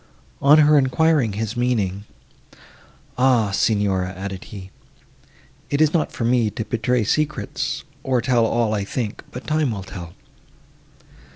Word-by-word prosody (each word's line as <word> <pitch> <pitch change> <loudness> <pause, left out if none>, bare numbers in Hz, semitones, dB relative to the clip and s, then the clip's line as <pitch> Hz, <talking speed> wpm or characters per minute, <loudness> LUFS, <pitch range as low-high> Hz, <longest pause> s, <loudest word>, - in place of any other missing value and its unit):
On 145 +2 +6
her 150 -1 +6
enquiring 135 -3 +2
his 110 +2 -3
meaning, 105 -5 -1 1.1
"Ah, 125 -5 +3
Signora!" 100 -3 +1
added 95 0 -6
he, 95 -2 -10 1.0
"it 140 - 0
is 155 -1 +3
not 165 - +1
for 115 - -3
me 120 -2 +2
to 110 +1 -5
betray 120 +2 0
secrets, 150 +3 -2 0.2
or 130 -3 0
tell 120 -1 +2
all 115 -2 0
I 100 -2 -1
think, 105 +1 -4
but 125 - -9
time 155 -2 +1
will 100 -4 -4
tell." 85 -3 -9
115 Hz, 135 wpm, -21 LUFS, 100-135 Hz, 1.1 s, On